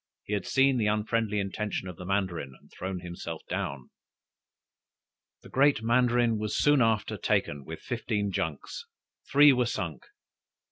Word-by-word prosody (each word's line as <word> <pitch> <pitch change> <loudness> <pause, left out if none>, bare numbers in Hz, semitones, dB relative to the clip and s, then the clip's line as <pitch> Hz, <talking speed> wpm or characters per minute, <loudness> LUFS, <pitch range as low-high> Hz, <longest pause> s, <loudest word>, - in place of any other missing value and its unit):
He 105 - -5
had 100 -3 -2
seen 135 -1 +3
the 105 - +1
unfriendly 105 0 0
intention 100 0 -3
of 90 - -7
the 90 - -9
mandarin, 95 -8 -2
and - - -24
thrown 95 -1 -5
himself 85 -2 -7
down. 70 -2 -4 1.5
The - - -13
Great 135 -4 +3
Mandarin 120 -1 +3
was 105 -1 -2
soon 145 -2 +4
after 110 -3 +1
taken 70 -2 0
with - - -8
fifteen 105 -2 -2
junks; 80 -5 -4 0.4
three 145 0 +8
were 125 -2 +1
sunk. 85 - -4
105 Hz, 145 wpm, -28 LUFS, 90-120 Hz, 1.5 s, three